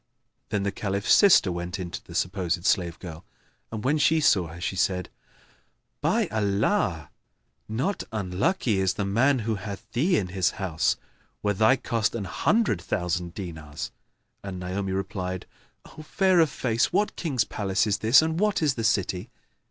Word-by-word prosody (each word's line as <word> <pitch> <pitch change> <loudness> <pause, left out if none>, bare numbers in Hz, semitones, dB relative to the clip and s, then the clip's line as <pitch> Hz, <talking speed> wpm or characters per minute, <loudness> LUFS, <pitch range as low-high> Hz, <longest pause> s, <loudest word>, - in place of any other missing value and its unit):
Then 100 -1 -1
the 100 - 0
Caliph's 100 0 0
sister 190 - +6
went 85 +2 -4
in 90 -3 -5
to - - -6
the - - -12
supposed 90 -1 -1
slave 85 -6 +1
girl 85 -2 -9 0.5
and, 110 -1 -5
when 150 +4 +2
she 160 +2 +4
saw 95 - +3
her, 80 +1 -10
she 90 - -3
said, 90 0 0 0.9
"By - - +2
Allah, 100 - 0 0.6
not 135 - -1
unlucky 105 - 0
is 95 -1 +1
the 100 - -2
man 125 +8 +3
who 115 - 0
hath 100 -1 -7
thee 165 +9 +2
in 90 - -1
his 90 0 0
house, 90 -6 0 0.5
were 105 0 +2
thy 110 +6 +4
cost 115 -4 -1
an 110 - -3
hundred 155 - +1
thousand 90 -1 -2
dinars!" 80 -6 -6 0.5
And 95 -2 -6
Naomi 95 +2 -3
replied, 95 -1 -3 0.4
"O - - -12
fair 185 +3 +2
of 160 -2 +5
face, 115 -3 0
what 205 +3 +1
King's 135 -9 0
palace 100 -1 -1
is 105 -2 0
this, 115 +8 +6
and 160 +1 -1
what 210 -4 +1
is 145 -3 +3
the 115 - -4
city?" 95 -5 0
100 Hz, 165 wpm, -26 LUFS, 90-125 Hz, 0.9 s, sister